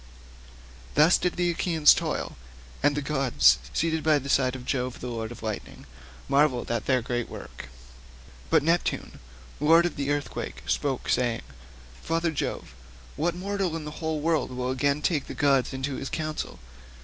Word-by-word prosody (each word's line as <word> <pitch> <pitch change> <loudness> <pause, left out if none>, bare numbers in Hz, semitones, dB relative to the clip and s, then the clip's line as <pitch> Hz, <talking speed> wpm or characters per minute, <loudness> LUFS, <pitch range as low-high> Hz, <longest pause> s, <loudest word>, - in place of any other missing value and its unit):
Thus 155 +4 +6
did 180 - 0
the 175 -1 +1
Achaeans 165 -3 +5
toil, - - -3 0.5
and 145 0 +2
the 145 - -1
gods, 130 - +4
seated 160 - 0
by 155 -1 +4
the 140 0 -5
side 130 -2 +2
of 125 -1 -8
Jove 125 -2 -2
the 125 - -5
lord 115 -1 -4
of 120 - -10
lightning, 110 -2 -5 0.4
marvelled 140 -4 +2
at 115 -2 -2
their 130 -3 +2
great 120 0 -2
work; 65 - -9 0.8
but - - +4
Neptune, 170 +2 0 0.4
lord 165 +4 +5
of 175 - -2
the 140 0 -2
earthquake, 145 -1 -3
spoke, 135 -3 -1
saying, 120 -3 +1 0.6
"Father 165 0 0
Jove, 140 - -4 0.4
what 170 +3 0
mortal 195 -2 -2
in 160 -2 -5
the 150 +1 -7
whole 160 -2 -1
world 160 0 +1
will 125 0 -3
again 140 +3 0
take 150 -4 0
the - - -7
gods 140 -3 +2
into 135 0 -3
his 135 - -5
counsel? 155 -1 -4
145 Hz, 165 wpm, -27 LUFS, 125-160 Hz, 0.8 s, Thus